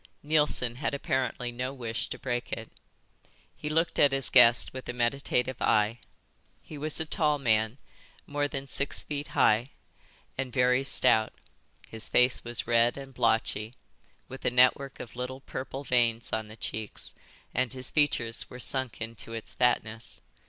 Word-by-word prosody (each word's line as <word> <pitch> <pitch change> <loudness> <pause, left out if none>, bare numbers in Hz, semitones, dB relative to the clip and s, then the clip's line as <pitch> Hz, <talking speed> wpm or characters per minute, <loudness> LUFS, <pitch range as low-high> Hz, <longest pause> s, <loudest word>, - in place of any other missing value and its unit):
Neilson 150 -5 +3
had 140 +1 -2
apparently 130 -2 -2
no 125 +2 -4
wish 115 -3 -4
to - - -6
break 120 -2 -3
it. 115 -1 -5 0.8
He 150 - -5
looked 165 +2 0
at 145 - +6
his 135 -1 +1
guest 120 -2 +6
with 130 0 -8
a - - -2
meditative 125 +1 -1
eye. 105 +2 +2 0.6
He 155 - -10
was 150 +1 -2
a 160 - -2
tall 150 -2 +1
man, 110 -2 +1 0.5
more 145 0 -1
than 140 -1 -6
six 140 +1 +2
feet 145 0 -5
high, 115 +5 +4 0.7
and 135 -2 -2
very 125 +1 +3
stout. 110 -4 +4 0.5
His 110 -1 -1
face 125 +1 +3
was 120 0 0
red 120 +1 +3
and 135 -1 -9
blotchy, 110 -1 0 0.5
with 130 - -10
a - - +3
network 130 +2 +3
of 120 - -9
little 125 +2 -5
purple 135 +1 -6
veins 120 -3 +1
on 110 -1 -1
the 110 +1 -12
cheeks, 110 -2 -5 0.4
and 125 -1 0
his 130 -1 -3
features 125 -6 +1
were 125 - -10
sunk 130 -2 -2
into 115 0 -7
its 115 -1 -5
fatness. 115 -2 -1
125 Hz, 160 wpm, -28 LUFS, 115-135 Hz, 0.8 s, at